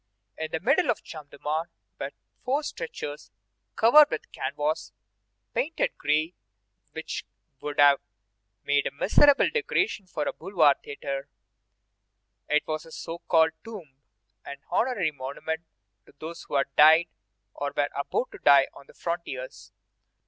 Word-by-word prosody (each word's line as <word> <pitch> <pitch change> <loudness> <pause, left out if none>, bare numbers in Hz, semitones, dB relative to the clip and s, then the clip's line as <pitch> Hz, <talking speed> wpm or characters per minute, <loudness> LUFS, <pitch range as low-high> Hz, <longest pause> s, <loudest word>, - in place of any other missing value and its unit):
In 160 0 -4
the 160 - -2
middle 275 - +2
of 230 - +2
the - - -23
Champ 155 -3 -10
de - - -14
Mars 155 +4 -2 0.3
were - - -3 0.3
four 280 +4 0
stretchers 150 - -6 0.5
covered 290 +7 +7
with 465 +1 -5
canvas - - -2 0.6
painted 470 - -1
gray 155 +4 0 0.6
which - - -5 0.4
would 145 0 -5
have 145 -1 +7 0.6
made 145 0 +2
a - - -3
miserable 275 - +5
decoration 405 - 0
for 160 -4 -3
a - - -2
boulevard 160 -7 +3
theatre. 140 -1 -5 1.2
It 150 0 +3
was 155 +1 -4
a - - -14
so 165 +1 -6
called 160 -1 +4
tomb, 170 -12 -11 0.4
an 140 - -8
honorary 210 -10 +1
monument 145 +4 -5 0.5
to - - -19
those 165 +2 -8
who - - -4
had 140 0 0
died 160 +3 +7 0.5
or 145 0 -3
were 145 0 +2
about 140 - -2
to - - -11
die 140 -1 +6
on 140 - -15
the - - -18
frontiers. 170 -7 -5
160 Hz, 145 wpm, -27 LUFS, 145-215 Hz, 1.2 s, covered